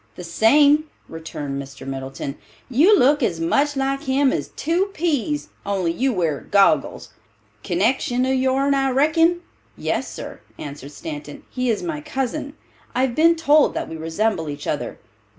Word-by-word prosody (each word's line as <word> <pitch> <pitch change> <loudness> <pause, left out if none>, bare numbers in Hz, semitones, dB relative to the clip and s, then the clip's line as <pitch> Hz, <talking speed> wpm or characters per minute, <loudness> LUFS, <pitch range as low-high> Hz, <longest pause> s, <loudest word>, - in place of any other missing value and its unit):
"The 180 - -8
same," 285 - +4 0.2
returned 145 -4 -5
Mr. 135 -1 -11
Middleton. 135 +1 -5 0.4
"You 340 - +5
look 290 +2 +4
as 175 -9 0
much 280 - +1
like 270 0 0
him 265 0 +2
as - - -2
two 335 +5 +1
peas, 300 -3 -1
only 190 -4 0
you 260 +10 0
wear 165 - 0
goggles. 200 -1 +2 0.5
Connection 255 -1 +1
of 260 - +1
your'n 265 +2 +2
I 270 -1 +2
reckon?" 325 +6 +3 0.4
"Yes, - - -2
sir," - - -8 0.2
answered 145 -1 -8
Stanton, 150 -3 -8
"he 250 -1 -1
is 220 - 0
my 320 -4 -3
cousin. 285 0 -3 0.4
I 250 - +2
have 260 -2 0
been 330 +5 +4
told 305 -2 +3
that - - -3
we 160 - -6
resemble 165 +1 -1
each 145 - -6
other." - - -3
260 Hz, 155 wpm, -22 LUFS, -, 0.5 s, You